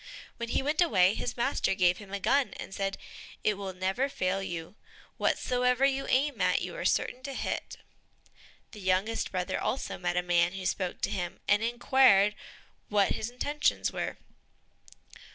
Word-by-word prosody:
When 235 0 -4
he 265 - 0
went 300 +4 +1
away, 190 - +4
his - - -4
master 240 -5 +1
gave 180 -1 +3
him 200 -2 -12
a 200 - -3
gun 275 +7 +1
and - - -7
said, 195 0 -2 0.5
"It 210 - +3
will 195 -1 -5
never 190 +9 -1
fail 185 -6 -1
you; 170 -2 -5 0.4
whatsoever 250 +1 +2
you 275 0 0
aim 285 +3 +1
at, - - +3
you - - -5
are - - -5
certain 255 - +1
to 275 0 -6
hit." - - -3 0.9
The 215 - -10
youngest 190 +4 0
brother 180 -1 -2
also 265 - -2
met 175 0 -1
a 180 - +2
man 175 0 +2
who 190 -1 -6
spoke 185 -1 -2
to - - 0
him, 175 -2 -3
and 210 0 +4
inquired 235 -3 +4 0.6
what 205 -2 +3
his 220 - -2
intentions 290 +4 0
were. - - -3
205 Hz, 170 wpm, -29 LUFS, 185-255 Hz, 0.9 s, away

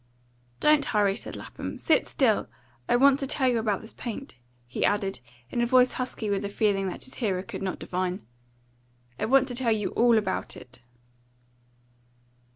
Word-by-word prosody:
"Don't 300 -1 +4
hurry," 205 -2 +2
said - - -6
Lapham. - - -7
"Sit - - +2
still! 240 -7 +2 0.4
I - - +4
want 275 +2 +5
to 275 - -2
tell 260 0 +1
you 240 -2 +2
about 210 -3 -1
this 220 - -9
paint," 245 +3 -6 0.3
he 120 - -3
added, 195 - 0 0.3
in 240 - 0
a - - +3
voice 255 0 +5
husky 250 -3 -4
with 200 -1 0
the 200 - -3
feeling 200 -2 +1
that - - -4
his 260 - -7
hearer 190 -5 0
could 200 -2 -7
not 190 -1 -2
divine. 185 - -3 0.9
"I - - 0
want 265 +3 +4
to - - -4
tell 245 -1 +1
you 210 -2 0
ALL 235 -1 +4
about 190 -3 -2
it." 125 0 -14
220 Hz, 175 wpm, -27 LUFS, 195-250 Hz, 0.9 s, want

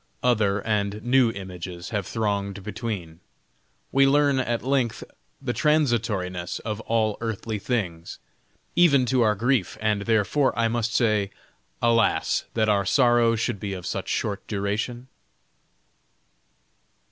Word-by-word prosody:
Other 105 -5 +2
and 105 -1 -1
new 125 0 +4
images 90 -3 -7
have 105 -5 -3
thronged 100 -3 -2
between; 100 -7 -5 0.7
we 135 0 +5
learn 140 -1 +3
at 120 -2 -1
length 130 -3 0 0.4
the 135 -3 -3
transitoriness 115 - 0
of 105 -1 -4
all 110 -2 +1
earthly 110 -1 -3
things, 95 -8 -3 0.6
even 145 -7 +5
to 125 +1 +2
our 105 -2 +3
grief, 120 -1 0
and, 105 -1 0
therefore. 115 +6 +2
I 115 -1 +2
must 115 0 -1
say 110 -4 +2 0.5
"Alas, 115 -1 +2
that 110 -1 +2
our 100 -2 +3
sorrow 120 +1 +3
should 115 -1 -2
be 100 0 -4
of 90 -2 -7
such - - -3
short 100 -1 -2
duration?" 110 +5 -3
110 Hz, 125 wpm, -25 LUFS, 100-120 Hz, 0.7 s, we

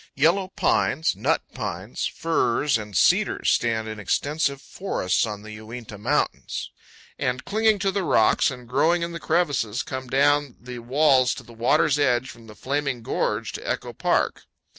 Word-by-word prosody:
Yellow 185 +4 +3
pines, 160 - +1
nut - - 0
pines, - - -4
firs, 150 -4 +1
and 105 -4 -3
cedars - - +3
stand 110 -2 +1
in 110 -1 -6
extensive 140 +6 0
forests 135 - -1
on 105 -1 -6
the 110 - -9
Uinta 110 0 -9
Mountains, 105 - -1 0.5
and, 125 0 -2
clinging 220 +1 +2
to 195 0 0
the 200 +1 -1
rocks 110 -9 +3
and 125 -2 -9
growing 160 +8 +2
in 170 - -3
the 170 - -6
crevices, 145 -10 0
come 130 0 -6
down 140 0 +2
the 125 0 -8
walls 130 +1 +3
to - - -9
the 120 - -15
water's 140 +5 +2
edge 130 -2 +1
from 115 -1 -15
Flaming 135 +1 -2
Gorge 110 -2 -1
to - - -7
Echo - - -3
Park. - - 0
130 Hz, 160 wpm, -24 LUFS, 115-155 Hz, 0.5 s, Yellow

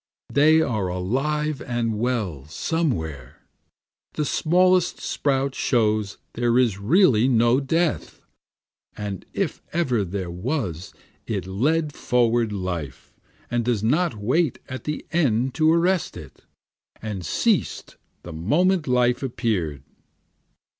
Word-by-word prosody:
They 155 +3 +5
are 110 -10 -1
alive 135 +11 -1
and 115 -4 -2
well 105 - -2
somewhere, 80 - -3 0.7
The 150 - -1
smallest 180 +4 +2
sprout 135 -1 -1
shows 110 -6 0 0.2
there 120 0 +1
is 115 -6 +2
really 125 - +4
no 120 0 +4
death, 160 +4 -1 0.8
And 100 -3 -5
if - - -2
ever 130 -10 +1
there 95 -1 -4
was 95 - -3 0.4
it - - -2
led 145 - 0
forward 120 -2 +1
life, 90 -9 -5 0.4
and 120 0 +1
does 115 -3 0
not 150 +4 +1
wait 130 +9 0
at 130 -3 -7
the 150 0 -4
end 130 -6 +1
to 155 0 +3
arrest 175 +2 +1
it, - - -13 0.5
And 105 -4 -5
ceas'd 80 - 0 0.3
the 85 - -8
moment 155 - +1
life 125 0 +2
appear'd. 110 - -2
120 Hz, 115 wpm, -23 LUFS, 100-150 Hz, 0.8 s, They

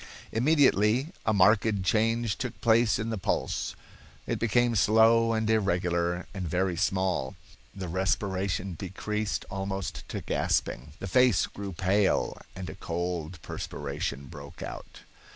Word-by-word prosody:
Immediately 130 -1 +3 0.2
a - - +5
marked 100 0 +4
change 115 +1 +1
took - - -4
place 115 -3 +4
in 110 +2 -3
the 110 - -3
pulse. - - -1 0.5
It - - -2
became 120 +1 +2
slow 110 +3 +5
and 110 -1 0
irregular, 90 -5 +1
and 95 -3 -4
very 90 +2 0
small. 95 -6 0 0.4
The 95 -2 -5
respiration 95 +1 -1
decreased 105 +4 -3
almost 95 -1 -4
to - - -4
gasping, 65 +4 -1
the 100 - -6
face 125 -2 +4
grew 100 -1 -7
pale, 95 +3 +1
and 95 -1 -6
a - - -6
cold 85 -1 -4
perspiration 70 +1 -4
broke - - -10
out. - - -8
100 Hz, 130 wpm, -28 LUFS, 90-110 Hz, 0.5 s, a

